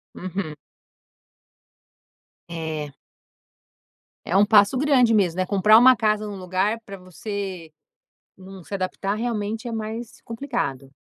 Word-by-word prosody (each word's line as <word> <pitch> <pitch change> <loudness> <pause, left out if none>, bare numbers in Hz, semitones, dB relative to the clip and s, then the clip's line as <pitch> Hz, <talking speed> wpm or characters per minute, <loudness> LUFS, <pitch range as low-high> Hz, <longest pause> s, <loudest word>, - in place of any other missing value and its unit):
Uhum. 185 -4 -5 2.0
É. 160 -3 -5 1.3
É 175 - -2
um 205 +1 +5
passo 215 +4 +5
grande 260 -5 +4
mesmo, 185 -5 +2
né? 185 - +1
Comprar 210 +3 +5
uma 255 +2 +7
casa 215 -2 0
num 205 -1 -6
lugar 190 +5 -1
para 195 -1 -8
você 185 -1 -6 0.7
não 190 -2 -12
se 200 - -7
adaptar 195 +1 -2
realmente 225 0 -3
é - - -5
mais 225 +1 -6
complicado. 225 - -4
200 Hz, 120 wpm, -23 LUFS, 185-225 Hz, 2.0 s, uma